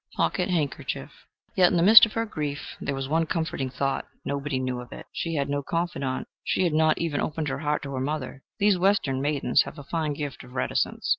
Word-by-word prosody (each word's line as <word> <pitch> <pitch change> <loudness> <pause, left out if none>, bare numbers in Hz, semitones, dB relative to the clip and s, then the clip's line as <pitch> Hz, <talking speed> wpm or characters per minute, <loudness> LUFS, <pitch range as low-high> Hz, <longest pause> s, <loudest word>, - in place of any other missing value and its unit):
(Pocket 180 0 0
handkerchief.) 155 -7 -2 0.4
Yet 180 -2 +6
in 180 - +1
the 170 - +3
midst 220 +4 +10
of 215 - -12
her 225 0 0
grief 150 -8 -5
there 140 - -2
was 135 0 -3
one 160 +3 +1
comforting 160 -6 -2
thought 135 +1 -2 0.2
nobody 140 -1 -2
knew 130 -1 -2
of 120 - -12
it. - - -9
She 165 -1 -3
had 140 -2 0
no 145 0 -1
confidante 140 -5 -2 0.2
she - - +1
had 170 -4 +1
not 155 0 +3
even 160 -4 -1
opened 155 -1 -2
her 135 - -3
heart 150 0 -1
to 140 -1 -5
her 130 - -2
mother: 135 -1 -3 0.2
these 200 -2 +3
Western 175 -9 +2
maidens 140 -3 +2
have - - -9
a 145 - -8
fine 155 +1 -2
gift 145 -2 -5
of 125 0 -14
reticence. 130 - -1
150 Hz, 220 wpm, -26 LUFS, 135-165 Hz, 0.4 s, midst